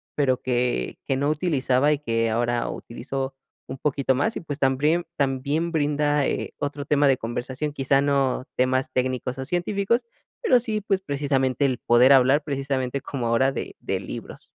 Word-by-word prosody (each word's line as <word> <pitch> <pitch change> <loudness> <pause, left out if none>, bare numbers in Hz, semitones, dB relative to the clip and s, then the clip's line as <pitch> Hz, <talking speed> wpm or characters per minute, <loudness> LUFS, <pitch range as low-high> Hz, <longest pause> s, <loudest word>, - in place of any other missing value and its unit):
pero 130 -3 +1
que 125 -1 -1
que 135 - 0
no 140 +2 0
utilizaba 145 -3 +2
y 145 - -2
que 115 -4 0
ahora 120 +1 0
utilizo 135 +3 -5 0.3
un 130 - -6
poquito 135 -1 0
más, 180 - 0
y - - -2
pues 145 -4 -5
también 150 +6 +2
también 140 +4 0
brinda, 150 -2 +1
eh, - - -3
otro 145 0 -4
tema 145 0 +3
de 135 -2 +4
conversación, 130 +5 -4
quizá 135 0 +2
no 140 -2 +1
temas 130 +3 +1
técnicos 130 0 -1
o 130 - -4
científicos, 200 - 0 0.4
pero 255 - +4
sí, 220 -3 -2
pues, 195 -1 0
precisamente 140 -3 0
el 130 -2 +1
poder 120 +3 +5
hablar, 135 +3 +5
precisamente, 135 -2 -2
como 130 -3 -4
ahora 115 +4 +3
de 135 - -6
de - - -2
libros. - - -8
135 Hz, 170 wpm, -24 LUFS, 130-150 Hz, 0.4 s, poder